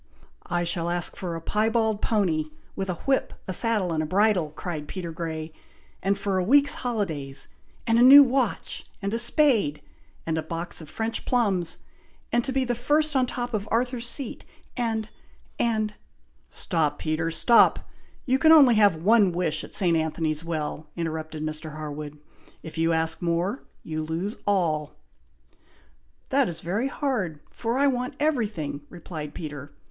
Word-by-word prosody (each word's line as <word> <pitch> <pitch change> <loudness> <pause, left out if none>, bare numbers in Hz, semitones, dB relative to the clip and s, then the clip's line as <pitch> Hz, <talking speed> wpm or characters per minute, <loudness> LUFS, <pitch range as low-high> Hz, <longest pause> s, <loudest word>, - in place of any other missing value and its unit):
"I 175 0 0
shall 170 0 -1
ask 175 0 -3
for 175 -3 -4
a 165 - -5
piebald 220 +2 +1
pony, 180 -8 +1 0.3
with 195 -1 -3
a 180 - -1
whip, 275 -1 +1
a 185 - -1
saddle, 210 -5 +2
and 155 - 0
a - - -1
bridle!" 190 -2 +2
cried 155 -1 -6
Peter 175 -1 -5
Grey; 160 -1 -5 0.5
"and 195 +1 +1
for 200 -1 -1
a - - 0
week's 285 +7 +5
holidays, 160 - -3 0.4
and 230 0 +3
a - - +5
new 275 +3 +10
watch, 255 -4 -1
and 200 +1 -3
a 230 - +1
spade, 235 - +3 0.5
and 160 -1 -1
a - - -1
box 165 +2 -4
of 155 - -11
French 225 0 -3
plums, 195 -9 +2 0.5
and 240 0 +2
to 265 - -3
be 265 0 +1
first 290 +5 +1
at - - +5
the 250 - -1
top 245 -1 -4
of 210 -1 -2
Arthur's 240 0 0
Seat, 270 -3 -4 0.3
and 225 -3 -1 0.5
and 215 -2 0 0.3
" - - -41 0.2
"Stop, 155 -4 0
Peter! 160 +1 -1
stop! 230 +8 +4 0.4
you 260 0 +2
can 315 +3 +6
only 285 -6 +8
have 205 -5 +5
one 200 +4 +4
wish 170 -3 -1
at - - -10
St. 175 -4 +3
Anthony's 160 -1 -1
Well," 155 -2 -4
interrupted 160 -2 -4
Mr. 155 0 -5
Harwood. 150 -1 -6 0.5
"If 160 - -9
you 165 +1 +1
ask 160 0 0
more, 175 +8 -1 0.2
you 155 -1 -4
lose 165 +7 -3
all." 160 -7 0 1.3
"That 270 -4 +2
is 165 -1 -6
very 200 +10 -1
hard, 225 - -2
for 235 +2 -2
I 280 - +3
want 250 -1 0
everything," 210 - -1
replied 160 -4 -8
Peter. 145 -3 -7
185 Hz, 165 wpm, -25 LUFS, 160-235 Hz, 1.3 s, new